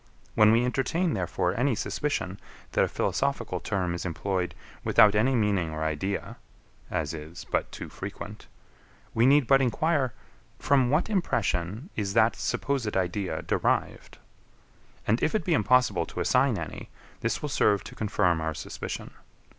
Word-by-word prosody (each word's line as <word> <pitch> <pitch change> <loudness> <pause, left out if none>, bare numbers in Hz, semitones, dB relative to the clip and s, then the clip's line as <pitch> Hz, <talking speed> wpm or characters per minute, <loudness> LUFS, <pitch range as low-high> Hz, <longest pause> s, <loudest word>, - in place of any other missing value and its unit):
When 105 0 +6
we 115 +2 +4
entertain, 155 +7 0
therefore, 90 0 -1
any 125 +1 +1
suspicion 100 -2 -2 0.3
that - - +3
a - - +2
philosophical - - -1
term 90 -3 -1
is 85 - -4
employed 90 +1 -2 0.3
without 105 -1 +6
any 125 +6 +3
meaning 100 -7 +1
or 80 0 -4
idea 80 +6 -2 0.5
(as 75 -1 -2
is 80 +2 -8
but - - 0
too - - -7
frequent), - - -8 0.7
we 115 +2 +4
need 145 0 +5
but 135 +2 +5
enquire, 135 0 +1 0.4
from 130 -3 +3
what 150 +6 +2
impression 115 - -1
is 100 -2 -2
that 115 0 +4
supposed 130 -8 -1
idea 90 -2 -1
derived? - - -1 0.9
And 110 +3 +1
if 155 - +1
it 215 - 0
be 175 - +2
impossible 105 - +3
to - - -7
assign - - +3
any, - - -6 0.3
this 115 - -2
will 150 - -2
serve 105 -6 +2
to - - -10
confirm 90 -6 +1
our 80 -1 -2
suspicion. - - -6
105 Hz, 150 wpm, -27 LUFS, 90-130 Hz, 0.9 s, When